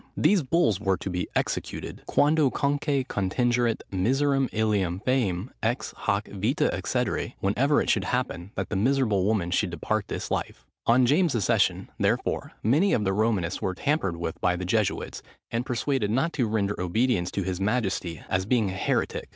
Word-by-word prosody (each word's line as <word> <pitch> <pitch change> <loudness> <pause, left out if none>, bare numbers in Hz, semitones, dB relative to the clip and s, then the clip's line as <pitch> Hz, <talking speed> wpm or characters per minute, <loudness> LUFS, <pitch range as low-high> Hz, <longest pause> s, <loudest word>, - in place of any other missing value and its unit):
These 200 -3 +4
bulls 130 - +2
were 95 -3 +1
to 95 - -5
be 90 0 -2
executed, - - -3
"Quandocunque 145 -2 +2
contingeret 120 +4 0
miseram 135 +7 +1
illam 100 -5 0
fœminam 115 -5 0
ex 115 +4 -1
hac 100 +1 0
vitâ 105 +7 0
excedere,"—whenever 135 +9 0
it - - -3
should 100 -3 +1
happen 110 -7 -2
that - - -3
that - - -2
miserable 110 -4 +2
woman 100 -5 0
should 95 +1 +1
depart 100 +5 -2
this - - -5
life. - - -3 0.2
On 125 +2 +5
James's 145 - +2
accession, - - +1
therefore, - - 0
many 150 - +3
of 105 - +2
the 95 -1 +1
Romanists 100 -4 0
were 95 -1 -1
tampered 140 - 0
with 85 -1 -5
by 90 0 +2
the 90 +1 -4
Jesuits, 105 +1 -1 0.3
and 120 +2 -2
persuaded 125 -3 0
not 135 +10 +1
to 125 -5 0
render 105 -3 -1
obedience 90 0 +1
to 100 - -2
his 95 0 -3
majesty, 95 -6 -1
as 95 +1 -1
being 110 -5 +2
a - - -5
heretic. 95 - -1
110 Hz, 165 wpm, -26 LUFS, 95-130 Hz, 0.3 s, On